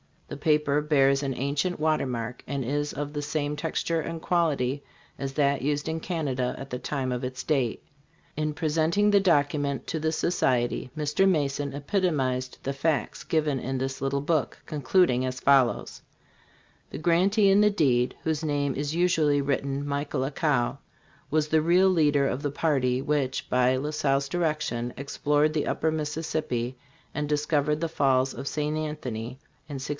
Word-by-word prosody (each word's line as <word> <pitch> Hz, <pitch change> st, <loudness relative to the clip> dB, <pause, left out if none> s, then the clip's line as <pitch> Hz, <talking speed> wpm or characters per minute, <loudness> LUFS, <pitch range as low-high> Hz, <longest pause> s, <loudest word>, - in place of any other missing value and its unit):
The -, -, -6 dB
paper 150 Hz, -1 st, +2 dB
bears 140 Hz, -2 st, +3 dB
an 135 Hz, -2 st, -2 dB
ancient 140 Hz, +8 st, -1 dB
watermark 125 Hz, -6 st, -1 dB
and 140 Hz, 0 st, -2 dB
is 145 Hz, +3 st, -1 dB
of 145 Hz, +1 st, -4 dB
the 145 Hz, 0 st, -3 dB
same 150 Hz, 0 st, -2 dB
texture 165 Hz, +2 st, -1 dB
and 165 Hz, 0 st, -5 dB
quality 145 Hz, -7 st, +1 dB, 0.4 s
as 135 Hz, -1 st, -4 dB
that 140 Hz, -1 st, +2 dB
used 145 Hz, +3 st, -1 dB
in 160 Hz, 0 st, -2 dB
Canada 140 Hz, -8 st, -2 dB
at 135 Hz, +1 st, -8 dB
the 125 Hz, -, -4 dB
time 130 Hz, -1 st, -2 dB
of 125 Hz, +1 st, -3 dB
its 125 Hz, 0 st, -5 dB
date. 135 Hz, -7 st, 0 dB, 0.5 s
In 155 Hz, 0 st, -1 dB
presenting 160 Hz, +7 st, +2 dB
the 200 Hz, -, +6 dB
document 145 Hz, -6 st, +1 dB
to 160 Hz, -, -2 dB
the 160 Hz, +1 st, 0 dB
Society, 125 Hz, -8 st, 0 dB
Mr. 150 Hz, +6 st, +2 dB
Mason 145 Hz, -4 st, 0 dB
epitomized 140 Hz, -5 st, -1 dB
the 135 Hz, -, -1 dB
facts 145 Hz, +2 st, -1 dB
given 150 Hz, -4 st, 0 dB
in 130 Hz, +2 st, -3 dB
this 130 Hz, 0 st, -3 dB
little 140 Hz, 0 st, 0 dB
book, 145 Hz, -4 st, 0 dB
concluding 145 Hz, -2 st, +2 dB
as 130 Hz, 0 st, -4 dB
follows: 135 Hz, -3 st, +2 dB, 0.9 s
"The -, -, -6 dB
grantee 190 Hz, +6 st, +3 dB
in 195 Hz, -, +5 dB
the 210 Hz, -, +5 dB
deed, 130 Hz, -11 st, +2 dB
whose 160 Hz, -1 st, -1 dB
name 145 Hz, -2 st, 0 dB
is 145 Hz, +3 st, -3 dB
usually 160 Hz, -5 st, +3 dB
written 140 Hz, 0 st, -1 dB
Michel 140 Hz, -1 st, -2 dB
Accau, 135 Hz, -2 st, 0 dB, 0.5 s
was 155 Hz, 0 st, +1 dB
the 155 Hz, 0 st, +3 dB
real 180 Hz, +4 st, +4 dB
leader 150 Hz, -6 st, +3 dB
of 135 Hz, 0 st, -1 dB
the 145 Hz, -, -2 dB
party 130 Hz, -5 st, +1 dB
which, 140 Hz, -2 st, -1 dB
by 125 Hz, 0 st, +3 dB
La 145 Hz, +4 st, -2 dB
Salle's 140 Hz, -2 st, 0 dB
direction, 155 Hz, -8 st, -1 dB
explored 145 Hz, +2 st, +1 dB
the 155 Hz, -, -1 dB
Upper 160 Hz, -, 0 dB
Mississippi 150 Hz, -5 st, -2 dB, 0.4 s
and 150 Hz, 0 st, -2 dB
discovered 150 Hz, 0 st, +1 dB
the 165 Hz, -, -1 dB
falls 135 Hz, -4 st, +2 dB
of 135 Hz, -, -6 dB
St. 150 Hz, +1 st, -1 dB
Anthony 130 Hz, -6 st, -4 dB, 0.3 s
in 145 Hz, -, -6 dB
1682. 135 Hz, +1 st, -5 dB
145 Hz, 165 wpm, -27 LUFS, 135-155 Hz, 0.9 s, the